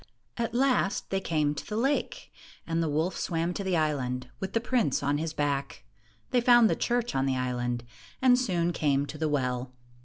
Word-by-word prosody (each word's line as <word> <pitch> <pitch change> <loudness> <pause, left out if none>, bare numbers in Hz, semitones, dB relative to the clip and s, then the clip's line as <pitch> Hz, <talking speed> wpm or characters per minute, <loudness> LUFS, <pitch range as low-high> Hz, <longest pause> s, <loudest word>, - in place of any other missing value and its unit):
At 235 -1 -2
last, 250 -6 +1
they 195 - +1
came 155 -5 0
to 150 - -6
the 210 - -5
lake, 270 +5 -1 0.3
and 165 0 -1
the 165 - 0
wolf 160 +5 0
swam 170 0 -1
to 200 - -4
the 185 -2 +1
island, 130 -5 -1
with 190 0 -4
the 230 - +2
prince 235 - 0
on 145 +1 +1
his 160 0 -2
back. 140 -5 -2 0.5
They 245 - +3
found 240 -2 +6
the - - +2
church 240 0 0
on 135 0 +1
the 130 -1 +1
island, 120 -1 -2 0.4
and 255 -1 +5
soon 175 -8 0
came 140 -3 +1
to 155 +1 -8
the 155 -1 0
well. 125 -3 -1
160 Hz, 195 wpm, -28 LUFS, 140-220 Hz, 0.5 s, found